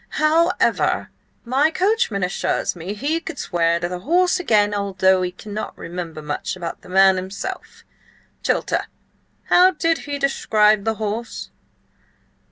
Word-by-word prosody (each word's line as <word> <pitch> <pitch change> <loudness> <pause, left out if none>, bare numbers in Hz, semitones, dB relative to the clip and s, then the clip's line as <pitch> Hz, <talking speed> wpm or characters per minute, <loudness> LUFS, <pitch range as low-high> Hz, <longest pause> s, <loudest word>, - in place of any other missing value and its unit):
"However, 325 +3 +2 0.3
my 270 +6 +2
coachman 365 - 0
assures 180 +1 -1
me 180 +4 -6
he 295 +9 -1
could 330 -3 -8
swear 170 -1 0
to 175 - -2
the 180 0 -5
horse 355 - +2
again, 210 -10 +2
although 190 -2 +2
he 180 0 -1
cannot 210 +3 -7
remember 170 -3 -7
much 150 +5 -3
about 170 -2 -6
the - - -15
man 190 0 +5
himself. 190 +2 -6 0.6
Chilter! - - 0 0.6
How 360 +1 +7
did 330 -2 0
he 285 0 -5
describe 215 -6 +2
the 225 0 0
horse?" 220 +2 -5
210 Hz, 135 wpm, -21 LUFS, 185-305 Hz, 0.6 s, How